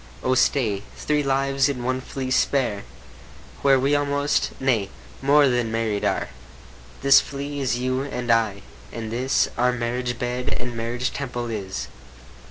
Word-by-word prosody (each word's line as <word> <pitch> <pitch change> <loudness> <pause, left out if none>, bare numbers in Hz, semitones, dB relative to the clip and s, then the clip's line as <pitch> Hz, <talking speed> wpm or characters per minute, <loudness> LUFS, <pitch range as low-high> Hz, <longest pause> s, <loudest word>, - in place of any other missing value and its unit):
O 130 - +2
stay, 120 -6 +2 0.2
three 150 -1 0
lives 135 0 +1
in 125 -3 -3
one 130 +1 -1
flea 130 0 -5
spare, 125 - +1 0.8
Where 135 -1 +5
we 140 +3 +2
almost, 145 0 +1
yea, 115 -7 +1 0.3
more 140 +1 +5
than 120 -3 0
married 110 -3 -1
are. - - 0 0.7
This 140 0 +7
flea 140 +1 -5
is 130 -3 0
you 130 +1 -1
and 125 -3 -2
I, 110 -4 +1 0.3
and 110 -2 -5
this 130 +3 +1
Our 125 +1 +4
marriage 125 0 -2
bed, 125 +2 -2
and 120 -1 -5
marriage 120 +2 -2
temple 120 -4 -4
is. 95 - -4
125 Hz, 150 wpm, -24 LUFS, 115-135 Hz, 0.8 s, This